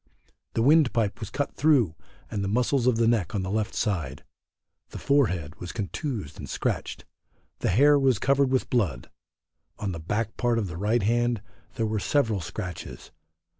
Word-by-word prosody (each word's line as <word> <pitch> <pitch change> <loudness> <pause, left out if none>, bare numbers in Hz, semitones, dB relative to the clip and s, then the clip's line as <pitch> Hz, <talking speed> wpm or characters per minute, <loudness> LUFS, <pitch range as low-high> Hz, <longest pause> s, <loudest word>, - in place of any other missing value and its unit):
The 115 - +2
windpipe 125 -7 +3
was 110 - -5
cut 145 +5 -2
through 135 - +3 0.4
and 100 -2 -2
the - - -1
muscles 125 +4 +1
of 125 - +4
the 115 0 +2
neck 110 -6 +1
on 95 - -1
the 95 - -3
left 110 +1 -1
side; 95 -8 -2 0.7
the - - -8
forehead 90 - +1
was 90 - -6
contused 105 - -4
and - - -7
scratched. - - -3 0.5
The - - 0
hair 145 +9 +5
was 130 -4 +3
covered 140 +3 +2
with 130 0 0
blood. 90 - 0 0.7
On 100 -2 -3
the 85 - -5
back 105 +7 -2
part 120 -2 +1
of 110 - 0
the 85 -2 -6
right 105 +4 +1
hand 120 0 +1 0.3
there 115 - 0
were 110 0 -1
several 110 -4 +1
scratches. 90 -2 -7
110 Hz, 170 wpm, -26 LUFS, 100-125 Hz, 0.7 s, hair